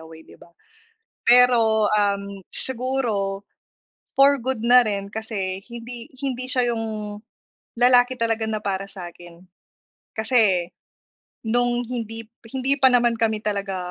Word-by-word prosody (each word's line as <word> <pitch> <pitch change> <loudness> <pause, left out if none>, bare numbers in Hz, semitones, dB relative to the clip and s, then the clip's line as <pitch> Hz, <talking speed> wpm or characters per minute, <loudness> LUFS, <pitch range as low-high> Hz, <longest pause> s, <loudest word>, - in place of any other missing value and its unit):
away" 160 0 -13
di - - -18
ba? - - -16 0.7
Pero, 235 -3 +5
um, 200 -2 -1
siguro 230 -6 -1 0.7
for 275 +1 +5
good 250 -2 -3
na 245 0 +6
rin 200 -1 -4
kasi 200 -4 -4
hindi 235 0 -8 0.2
hindi 255 -2 -2
siya 250 -3 +1
yung 215 -2 -5 0.6
lalaki 245 0 +4
talaga 225 -1 0
na 220 -1 -2
para 195 -1 -3
sa 195 -3 -8
akin. 175 0 -15 0.8
Kasi, 215 -7 +2 0.7
noong 245 +1 0
hindi 225 -2 -5 0.2
hindi 265 +2 -1
pa 265 - +7
naman 240 -2 +2
kami 220 -1 0
talaga, 200 -2 -2
225 Hz, 125 wpm, -22 LUFS, 200-245 Hz, 0.8 s, pa